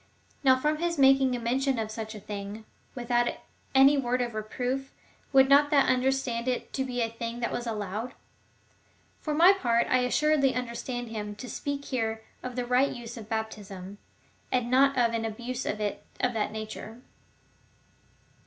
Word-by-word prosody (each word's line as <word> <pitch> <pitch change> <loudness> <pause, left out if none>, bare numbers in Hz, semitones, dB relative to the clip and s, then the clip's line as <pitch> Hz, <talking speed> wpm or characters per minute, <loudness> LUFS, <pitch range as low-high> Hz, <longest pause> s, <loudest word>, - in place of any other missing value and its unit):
Now 260 -1 +5
from 300 +3 +1
his 340 +1 -1
making 270 -1 +5
mention 265 +2 +1
of 220 -1 -2
such 220 0 -6
a - - -7
thing 205 +1 -7 0.3
without 240 -1 +1 0.5
any 275 +2 +7
word 250 -1 0
of 240 -2 -2
reproof, 250 +5 -3 0.4
who 270 - +1
would 265 0 +8
not 285 +1 +5
under 265 -2 +4
stand 250 -3 -2
it 250 -1 -2
to 265 - 0
be 250 -2 -3
a 225 - +1
thing 230 +1 -5
that 235 - -1
was 240 0 -3
allowed? 215 +2 -4 1.0
For 305 -2 -2
my 350 +5 +7
part, 235 -10 +1
I 255 - +2
assuredly 275 +2 +2
understand 245 0 -4
him 210 -2 -5
to 220 +5 -8
speak 285 +2 -4
here 225 -3 -2 0.2
of 255 -1 -6
the 250 -1 -2
right 250 +3 +3
use 240 -1 -7
of 220 -3 -10
baptism, 205 -3 -5 0.5
and 250 -1 0
not 275 +1 +4
of 235 -2 +3
an 225 -1 -1
abuse 240 +3 -4
of 210 - -2
it 210 -1 -3 0.2
of 250 -1 +1
that 220 -2 -1
nature. 220 +1 -7
245 Hz, 170 wpm, -28 LUFS, 225-265 Hz, 1.0 s, would